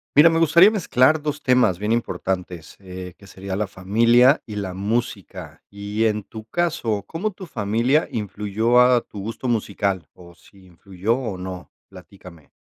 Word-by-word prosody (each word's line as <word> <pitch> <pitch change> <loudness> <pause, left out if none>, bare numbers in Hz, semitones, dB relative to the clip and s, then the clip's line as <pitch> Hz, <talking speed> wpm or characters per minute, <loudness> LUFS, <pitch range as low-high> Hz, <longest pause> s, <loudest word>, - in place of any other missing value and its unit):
Mira, 155 +3 +8
me 165 - +1
gustaría 170 +4 +6
mezclar 155 - +2
2 150 0 -4
temas 125 -8 +2
bien 105 +2 0
importantes, 90 -7 -4
eh, 90 -2 -9
que 100 - -17
sería 95 0 -6
la 105 +2 -1
familia 115 - +3
y 105 -3 -7
la 95 -3 -4
música, 95 -6 -4
y 100 +2 -3
en 105 -1 0
tu 110 +2 -10
caso, 115 - -2
¿cómo 190 +6 -3
tu 190 -1 -10
familia 115 - 0
influyó 105 +3 +1
a 125 0 +5
tu 105 - -11
gusto 115 +5 -5
musical? 100 -5 -2
¿O 85 -1 -16
si 95 +1 -21
influyó 95 +4 -3
o 115 -7 -4
no? 90 -1 -8 0.2
Platícame. 90 -4 -15
105 Hz, 160 wpm, -22 LUFS, 95-125 Hz, 0.2 s, Mira